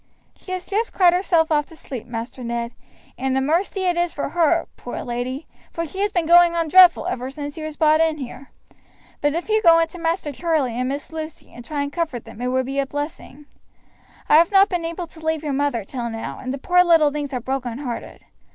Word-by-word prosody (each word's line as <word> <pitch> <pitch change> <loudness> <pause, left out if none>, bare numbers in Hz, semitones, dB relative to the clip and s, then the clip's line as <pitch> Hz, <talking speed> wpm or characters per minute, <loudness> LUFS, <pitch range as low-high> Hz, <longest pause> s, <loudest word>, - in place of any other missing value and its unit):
"She 370 - -11
has 365 0 -4
just 440 +3 -1
cried 355 -2 +5
herself 345 -3 +2
off 295 -1 +2
to 325 - -14
sleep, 255 -6 -8
Master 240 +2 -6
Ned, 235 0 -3 0.5
and 265 0 0
a - - +3
mercy 335 +8 0
it 355 -2 +1
is 345 -1 +1
for 285 - -4
her, 335 +1 +2
poor 245 - -6
lady, 250 +4 -4 0.3
for 335 - -3
she 380 +5 -8
has 410 +1 +1
been 345 -4 0
going 345 +1 +6
on 330 -2 0
dreadful 360 -1 +7
ever 260 -8 -3
since 290 +1 -6
he 320 - -8
was 310 -1 -6
brought 310 0 +4
in 320 -1 +2
here; 265 0 -8 0.7
but 290 +1 +1
if 340 - -3
you 435 0 +2
go 335 -4 +7
in 330 0 +3
to 355 - -10
Master 330 -2 -1
Charlie 300 -4 0
and 255 +1 -1
Miss 285 +3 -5
Lucy 315 -1 -8
and 240 - -10
try 285 +3 -3
and 285 0 -5
comfort 315 -9 -3
them 235 - -11
it 250 - -1
would 260 0 0
be 270 +2 -2
a 275 - 0
blessing. 290 0 -6 0.8
I - - +6
have 335 +3 +4
not 390 0 +6
been 350 -3 -2
able 335 +2 -4
to 320 -1 -16
leave 320 -1 -1
your 295 -2 -2
mother 275 -5 0
till 240 +1 -4
now, 225 0 -6
and 255 - -5
the 275 - -3
poor 360 +6 +4
little 325 -4 +4
things 290 -1 -4
are 255 - -2
broken 250 -1 -3
hearted. 255 -4 -7
305 Hz, 235 wpm, -22 LUFS, 265-340 Hz, 0.8 s, dreadful